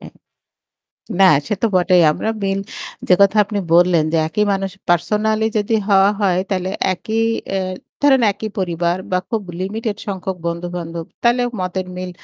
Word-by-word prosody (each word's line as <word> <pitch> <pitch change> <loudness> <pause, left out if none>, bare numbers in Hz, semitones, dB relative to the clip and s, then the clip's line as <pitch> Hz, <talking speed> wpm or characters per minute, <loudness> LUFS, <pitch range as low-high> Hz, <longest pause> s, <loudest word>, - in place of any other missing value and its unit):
অ্যাঁ - - -12 1.1
না 190 - +8 0.2
সে 210 - 0
তো - - +4
বটেই। 180 -1 +4
আমরা 220 - -2
মিল 195 0 0 0.5
যে 180 - +7
কথা 200 +2 +5
আপনি 205 0 -4 0.2
বললেন 175 -2 +4
যে - - +2
একই 210 +6 0
মানুষ 195 0 -2 0.2
পার্সোনালই 215 +5 +1
যদি 210 +2 0
হওয়া 195 0 +5
হয় 185 -2 +2
তাহলে 185 -1 -1 0.2
একই 220 +5 -2 0.3
অ্যা 195 0 0 0.5
ধরেন 270 -3 +5
একই 215 +2 -6
পরিবার 175 -1 0 0.2
বা 185 - +3
খুব 225 -3 -1 0.2
লিমিটেড 210 +2 -3
সংখ্যক 190 -1 -4
বন্ধু-বান্ধব 170 -1 -4 0.2
তাহলে 240 +1 +3 0.2
মতের 185 0 -3
মিল 185 0 -5
195 Hz, 155 wpm, -19 LUFS, 180-210 Hz, 1.1 s, না